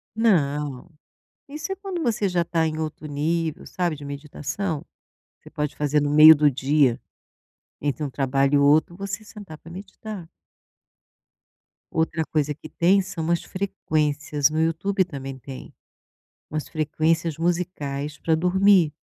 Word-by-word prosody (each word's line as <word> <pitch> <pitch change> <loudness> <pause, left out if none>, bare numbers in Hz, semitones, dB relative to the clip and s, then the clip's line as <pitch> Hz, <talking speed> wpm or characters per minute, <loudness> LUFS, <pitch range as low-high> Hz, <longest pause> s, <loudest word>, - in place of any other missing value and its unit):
Não. 150 - +1 0.6
Isso 305 +7 -5
é - - -4
quando 380 -4 -5
você 215 -5 +1
já 175 -1 +1
tá 165 -1 +1
em 155 0 -3
outro 155 0 -5
nível, 155 +2 -2
sabe, 175 -4 -2
de 145 - -10
meditação. 150 +4 -4 0.6
Você - - -15
pode 150 -2 -3
fazer 150 0 +1
no 145 - 0
meio 155 +2 +9
do 150 0 +4
dia, 135 -1 +2 0.8
entre 145 +1 -1
um 140 - -2
trabalho 135 +1 +1
e - - +6
outro 150 +4 +4
você 200 +2 -5
sentar 205 -7 -11
pra 165 - -14
meditar. 195 -1 -8 1.6
Outra 160 0 0
coisa 150 -1 -1
que 155 +2 -12
tem 190 +4 +3
são 170 -3 -3
as 170 - +1
frequências. 150 -6 0
No 155 - -1
Youtube 185 +5 +1
também 135 -5 -7
tem 130 0 -10 0.8
umas 155 0 -3
frequências 160 +1 0
musicais 155 -4 -2
pra 160 0 +1
dormir. 180 -1 +4
160 Hz, 140 wpm, -24 LUFS, 145-180 Hz, 1.6 s, meio